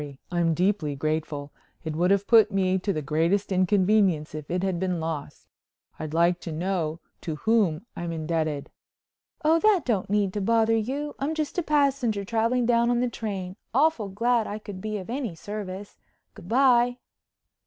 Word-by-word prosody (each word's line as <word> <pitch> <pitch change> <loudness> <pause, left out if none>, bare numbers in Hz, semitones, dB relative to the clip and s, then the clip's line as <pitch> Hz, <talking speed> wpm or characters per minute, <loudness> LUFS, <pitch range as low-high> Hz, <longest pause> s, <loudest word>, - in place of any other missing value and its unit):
I'm 170 -2 +1
deeply 180 -5 0
grateful. 150 -1 -3 0.3
It 160 -2 -4
would 175 +3 +2
have 200 0 +3
put 220 -2 +6
me 190 -1 +1
to 200 +2 -1
the 155 -5 -3
greatest 165 +8 +1
inconvenience 185 -3 +2
if 155 -1 -7
it 180 +1 -1
had 190 -3 0
been 180 -2 -1
lost. 160 -3 -5 0.5
I'd 155 -1 -5
like 170 +2 +2
to 170 - -6
know 165 -1 -2 0.2
to 160 - -4
whom 200 -2 +1
I'm 170 -1 -4
indebted." 155 -2 -2 0.7
"Oh, 320 +2 +5
that 415 -1 +4
don't 210 -7 0
need 200 -2 +1
to 205 - -2
bother 225 +2 +3
you. 275 +7 -2
I'm 295 +4 -1
just 310 +2 -2
a - - +2
passenger 275 - +1
traveling 230 +3 +1
down 235 0 +3
on 240 -1 +2
the 250 0 +1
train. 195 -4 -5 0.2
Awful 275 -7 +2
glad 230 +3 +1
I 205 - -4
could 205 -3 -9
be 215 0 -3
of 185 - -7
any 245 -9 -3
service. 200 +1 -7 0.3
Good 175 - -13
bye." 245 -1 +4
195 Hz, 175 wpm, -26 LUFS, 170-230 Hz, 0.7 s, put